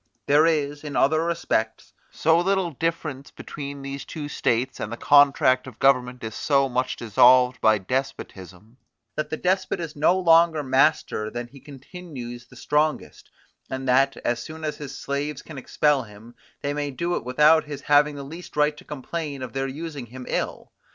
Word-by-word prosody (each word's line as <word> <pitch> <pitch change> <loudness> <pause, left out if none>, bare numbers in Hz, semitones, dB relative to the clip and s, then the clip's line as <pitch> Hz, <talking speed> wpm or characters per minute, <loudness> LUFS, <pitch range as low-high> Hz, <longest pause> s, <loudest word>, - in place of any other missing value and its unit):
There 150 +3 +4
is, 145 -2 -1
in 150 -2 -6
other 155 +3 +3
respects, 140 -10 -2 0.2
so 160 +1 +2
little 190 -1 0
difference 155 -2 -3
between 140 -1 -8
these 140 0 -6
two 150 -3 -7
states, 125 -1 -1
and 105 - -4
the 120 - -5
contract 135 -2 +4
of 120 -4 -11
government 125 -2 +2
is 110 -1 -5
so 140 +2 +1
much 130 0 -1
dissolved 125 +3 +4
by 110 -1 +4
despotism, 105 -3 -5 0.4
that 155 0 -3
the 155 - -3
despot 185 +2 0
is 165 -3 -6
no 155 +5 +3
longer 165 -3 +4
master 130 -5 +1
than 120 +2 -5
he 135 +3 -15
continues 135 -4 -10
the 125 - -17
strongest, 150 +4 -1 0.4
and 130 0 -5
that, 135 +2 +3
as 120 -1 0
soon 160 +4 -9
as 155 -1 -3
his 140 -2 -8
slaves 140 +1 -4
can 155 -4 -9
expel 145 +1 +1
him, 110 +1 -13 0.3
they 145 - -1
may 145 0 -2
do 170 +6 -2
it - - -3
without 150 +6 +4
his 145 -2 -7
having 145 +1 +3
the 140 - -7
least 160 +4 -10
right 150 0 +3
to - - -13
complain 150 -1 -5
of 125 - -7
their 135 0 -2
using 145 -2 -7
him 125 +2 -10
ill. - - -3
140 Hz, 180 wpm, -24 LUFS, 125-155 Hz, 0.4 s, There